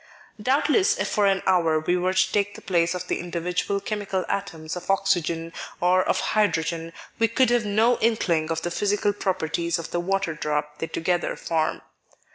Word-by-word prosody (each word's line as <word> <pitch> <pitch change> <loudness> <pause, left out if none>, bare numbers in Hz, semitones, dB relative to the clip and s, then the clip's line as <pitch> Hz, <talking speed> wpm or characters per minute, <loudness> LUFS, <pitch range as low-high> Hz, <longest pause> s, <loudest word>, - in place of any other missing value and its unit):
Doubtless 290 - +3
if - - -1
for 205 -1 +2
an 195 -1 +1
hour 165 -4 +3
we 165 +3 0
were 185 +1 0
to 185 0 +3
take 205 0 0
the - - -10
place 170 -1 +1
of 180 0 -5
the - - -1
individual 180 +3 -2
chemical 200 -2 -3
atoms 165 -5 -4
of 180 - -8
Oxygen 170 -4 0 0.3
or 180 +1 +3
of - - +1
Hydrogen, 165 -5 0 0.3
we 225 - +4
could 240 +2 +2
have 240 -3 +2
no 225 +4 +3
inkling 175 -8 +1
of 160 0 -2
the 175 - -2
physical 205 +2 +1
properties 170 -4 -1
of 165 - -7
the 175 - 0
water 190 -1 -1
drop 150 0 -3
they 165 - -2
together 175 +2 -1
form. 160 -1 -1
180 Hz, 180 wpm, -24 LUFS, 165-200 Hz, 0.3 s, we